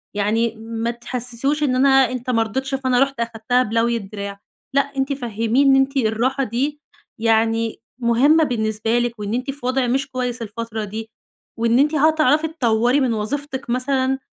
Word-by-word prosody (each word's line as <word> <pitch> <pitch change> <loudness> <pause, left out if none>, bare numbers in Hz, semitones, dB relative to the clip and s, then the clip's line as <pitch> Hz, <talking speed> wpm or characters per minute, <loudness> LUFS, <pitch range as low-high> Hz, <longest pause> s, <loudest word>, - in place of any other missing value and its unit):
يعني 220 +3 0
ما 225 +1 -3
تحسِّسهوش 245 +4 -2
إن 260 -3 +1
أنا 270 +2 +4 0.2
أنت 255 0 -5
ما 230 -2 +3
رضيتش 265 +5 -3
فأنا 260 -2 +1
رُحت 275 -2 -5
أخدتها 235 +2 0
بلوي 230 +1 +1
الدراع. 200 -1 -7 0.4
لأ 280 - +6 0.2
أنتِ 270 +1 0
فَهّميه 235 0 0
إن 270 -1 +6
أنتِ 270 +1 +2
الراحة 250 +3 +1
دي 270 +5 -2 0.4
يعني 225 0 +1 0.2
مهمة 265 +7 +4
بالنسبة 225 -2 0
لِك 240 -2 -2
وإن 205 +1 -3
أنتِ 255 +3 -2
في 280 -2 -11
وضع 255 0 +1
مش 270 +3 0
كويس 250 -2 -3
الفترة 225 0 -5
دي 220 +2 -6 0.5
وإن 230 +2 +3
أنتِ 300 +3 +3
هتعرفي 310 0 +3
تطوري 245 -4 +1
من 255 -4 +1
وظيفتِك 265 +5 -4
مثلًا 260 +1 0
245 Hz, 165 wpm, -21 LUFS, 225-270 Hz, 0.5 s, لأ